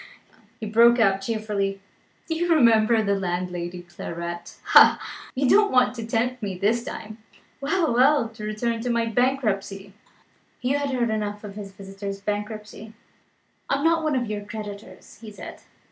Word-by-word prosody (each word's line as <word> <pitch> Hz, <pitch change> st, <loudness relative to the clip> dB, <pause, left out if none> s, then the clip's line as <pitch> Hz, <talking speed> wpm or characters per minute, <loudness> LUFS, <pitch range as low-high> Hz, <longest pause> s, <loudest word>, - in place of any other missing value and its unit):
he 220 Hz, -, -5 dB
broke 235 Hz, +3 st, +5 dB
out 195 Hz, -4 st, +3 dB
cheerfully. 200 Hz, -2 st, -2 dB, 0.5 s
"Do 325 Hz, -, -1 dB
you 345 Hz, +2 st, -1 dB
remember 230 Hz, -6 st, +4 dB
the 200 Hz, -1 st, +1 dB
landlady's 175 Hz, -2 st, -4 dB
claret? 170 Hz, 0 st, -6 dB
Ha! -, -, +7 dB, 0.4 s
you 265 Hz, +1 st, +1 dB
don't 415 Hz, +8 st, +5 dB
want 250 Hz, -1 st, +4 dB
to 230 Hz, -2 st, -6 dB
tempt 245 Hz, +3 st, -1 dB
me 195 Hz, -3 st, -4 dB
this 220 Hz, +5 st, +1 dB
time. 220 Hz, -2 st, -8 dB, 0.4 s
Well! 320 Hz, 0 st, +1 dB
well! 260 Hz, 0 st, +4 dB
to 220 Hz, -1 st, -11 dB
return 225 Hz, +2 st, -2 dB
to 250 Hz, -, -3 dB
my 235 Hz, -1 st, +1 dB
bankruptcy." 215 Hz, -5 st, -1 dB, 0.7 s
Hugh 265 Hz, +3 st, 0 dB
had 285 Hz, -1 st, -2 dB
heard 245 Hz, -4 st, 0 dB
enough 210 Hz, -1 st, -3 dB
of 205 Hz, -1 st, -8 dB
his 200 Hz, -1 st, -8 dB
visitor's 195 Hz, 0 st, -7 dB
bankruptcy. 210 Hz, +1 st, -5 dB, 0.8 s
"I -, -, +3 dB
am 280 Hz, -, -3 dB
not 330 Hz, 0 st, +3 dB
one 310 Hz, -3 st, 0 dB
of 250 Hz, -2 st, 0 dB
your 210 Hz, -2 st, -4 dB
creditors," 210 Hz, -1 st, -9 dB
he 220 Hz, -, -9 dB
said. 205 Hz, -, -10 dB
220 Hz, 160 wpm, -24 LUFS, 200-245 Hz, 0.8 s, Ha